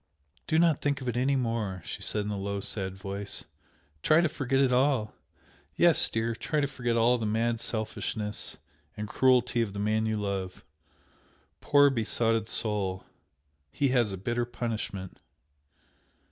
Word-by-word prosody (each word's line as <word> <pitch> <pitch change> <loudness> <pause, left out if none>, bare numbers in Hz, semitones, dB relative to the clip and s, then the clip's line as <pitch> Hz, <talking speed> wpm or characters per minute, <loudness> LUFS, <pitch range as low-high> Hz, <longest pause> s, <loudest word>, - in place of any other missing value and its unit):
"Do 160 - +2
not 165 -3 +3
think 145 -1 0
of 130 - -6
it 120 - -1
any 130 +3 +2
more!" 115 - -2
she - - -6
said 105 -1 -1
in 105 - -3
a 100 - -3
low 100 0 -2
sad 95 -1 -3
voice 100 +1 -5 0.6
"Try 155 - +5
to 170 - +2
forget 135 -4 -1
it 135 -2 +3
all. 125 -4 +2 0.6
Yes, - - +5
dear! 115 +1 -1
try 150 +6 -2
to 145 - +2
forget 120 -4 -1
all 120 +2 +4
the 110 - -1
mad 115 +2 0
selfishness 110 -2 -3 0.4
and 105 0 -4
cruelty 125 0 +3
of 105 -4 -2
the 100 - -5
man 110 +2 +1
you 110 0 0
love! 100 -3 -4 0.9
Poor, 145 -1 +5
besotted 115 -2 0
soul! 100 -4 -1 0.7
he 140 - +1
has 120 -5 +2
a 95 - -4
bitter 120 +6 -1
punishment!" 110 -6 -5
115 Hz, 160 wpm, -28 LUFS, 105-125 Hz, 0.9 s, Try